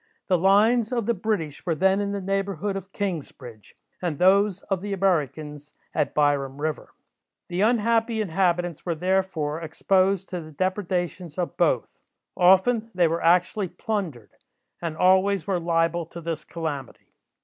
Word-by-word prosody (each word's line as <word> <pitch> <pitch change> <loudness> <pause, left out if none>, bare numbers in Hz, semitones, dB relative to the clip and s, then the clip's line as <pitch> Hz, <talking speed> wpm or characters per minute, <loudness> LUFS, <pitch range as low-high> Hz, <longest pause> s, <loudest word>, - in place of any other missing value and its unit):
The 185 - +4
lines 215 +5 +4
of 235 -4 -1
the 235 - +2
British 190 -8 -3
were 170 -3 0
then 190 +4 +2
in 200 0 -2
the 200 - -2
neighbourhood 195 0 -2
of 195 0 -7
Kingsbridge, 140 - -6 0.3
and 170 -5 -2
those 195 +2 +3
of 195 -3 -2
the 205 0 -4
Americans 150 -5 -1 0.2
at - - -1
Byram 145 -2 +1
river. 155 0 -4 0.5
The 180 +1 -1
unhappy 230 0 +2
inhabitants 175 -3 0
were, 170 -2 -2
therefore, 175 -3 -1
exposed 190 +4 +1
to 180 -2 -4
the 155 0 -11
depredations 180 -2 -2
of 175 -1 -2
both. 150 -9 0 0.3
Often 205 +6 +4
they 175 -2 +4
were 165 +1 -1
actually 180 +4 +2
plundered, 175 - -4 0.5
and 165 -2 -4
always 190 0 +3
were 190 -3 0
liable 165 0 0
to 170 - -9
this 165 -2 -5
calamity. 150 -6 -6
180 Hz, 150 wpm, -25 LUFS, 160-195 Hz, 0.5 s, The